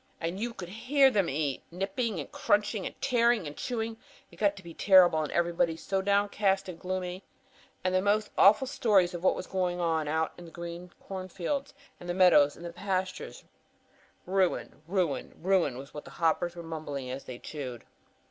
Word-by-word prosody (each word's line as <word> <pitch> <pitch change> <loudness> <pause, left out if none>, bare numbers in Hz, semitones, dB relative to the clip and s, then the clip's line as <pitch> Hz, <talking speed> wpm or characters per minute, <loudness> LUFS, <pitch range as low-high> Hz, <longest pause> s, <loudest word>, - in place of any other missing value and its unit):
"And 170 +3 -3
you 235 +2 -2
could 175 -2 -7
hear 265 +7 +3
them 200 -6 +1
eat! 140 -1 -1
Nipping 195 +3 -2
and 145 - -7
crunching, 205 0 0
tearing 235 -5 +3
and 145 0 -6
chewing. 225 - -3 0.3
It - - -16
got 205 -1 +2
to 195 - -12
be 170 -1 -10
terrible, 180 -4 +6
and 150 - -3
everybody 170 -1 +1
so 190 +3 -1
downcast 200 -1 +1
and 175 -3 -7
gloomy. 185 0 -4 0.6
And 185 0 +1
the 185 - +3
most 210 +2 +1
awful 210 +7 +6
stories 205 -9 +2
of 175 0 -6
what - - +4
was - - -5
going 180 -2 -1
on 160 -3 0
out 160 +1 0
in 175 - -10
the - - -10
great 170 +1 -7
corn 190 -1 -6
fields 270 - -3 0.2
and 175 - -9
meadows 150 -6 +6
and 170 0 -8
pastures. 185 0 -3 0.8
Ruin, 185 -4 0
ruin, 180 -5 -1
ruin 180 -8 +2
was 135 +1 -10
what 150 - -8
the - - -10
hoppers 170 +1 +1
were 170 - -7
mumbling 145 -5 -5
as 135 +2 -6
they 125 - -7
chewed. 130 -4 -7
180 Hz, 180 wpm, -29 LUFS, 165-200 Hz, 0.8 s, terrible